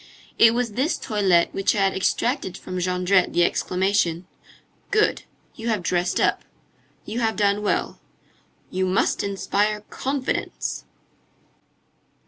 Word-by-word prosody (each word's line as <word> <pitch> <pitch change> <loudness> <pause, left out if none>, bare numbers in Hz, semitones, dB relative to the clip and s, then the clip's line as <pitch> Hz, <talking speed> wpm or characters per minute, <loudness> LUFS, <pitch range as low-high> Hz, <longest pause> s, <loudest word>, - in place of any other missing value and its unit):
It 230 0 +7
was 245 -2 -1
this 265 - 0
toilette 195 -7 +2
which 195 0 +1
had 195 -3 +2
extracted 190 0 -1
from 185 0 -6
Jondrette 180 +1 +2
the 175 - +4
exclamation: 185 -1 0 0.6
"Good! 425 0 +1 0.3
You 225 - -7
have 215 -6 0
dressed 175 0 0
up. - - +2 0.6
You 225 +3 -4
have 225 -2 0
done 205 0 +1
well. 210 - -1 0.7
You 185 0 0
must 185 - +1
inspire 205 +1 0
confidence!" 270 0 -3
200 Hz, 115 wpm, -23 LUFS, 185-225 Hz, 0.7 s, It